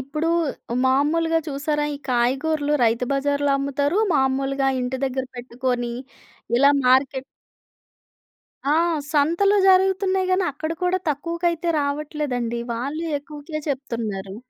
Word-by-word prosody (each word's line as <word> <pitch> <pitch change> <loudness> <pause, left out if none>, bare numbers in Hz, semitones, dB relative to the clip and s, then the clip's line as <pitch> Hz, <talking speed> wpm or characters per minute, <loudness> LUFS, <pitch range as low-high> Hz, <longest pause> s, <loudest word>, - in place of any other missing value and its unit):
ఇప్పుడు 300 +5 -3 0.6
మామూలుగా 325 +5 +2
చూసారా? 295 +1 -1
ఈ - - -5
కాయగూరలు 285 +5 +1
రైతు 230 +2 +2
బజార్‌లో 285 +1 +1
అమ్ముతారు. 285 +6 0 0.2
మామూలుగా 270 0 +1
ఇంటి 250 +1 -2
దగ్గర 260 0 -2
పెట్టుకొని, 245 0 -2 0.6
ఇలా 280 +3 +6 0.2
మార్కెట్ 265 +1 +3 1.5
ఆ! - - +4 0.4
సంతలు 340 +8 +3
జరుగుతున్నాయి 380 0 +3
గాని, 370 0 +2
అక్కడ 315 +3 -4
కూడా 360 +1 +2
తక్కువకైతే 335 +3 -1
రావట్లేదండి. 285 -5 -2
వాళ్ళు 280 +8 -3
ఎక్కువకే 300 +2 -7
చెప్తున్నారు. 220 -8 -4
285 Hz, 105 wpm, -23 LUFS, 260-315 Hz, 1.5 s, ఇలా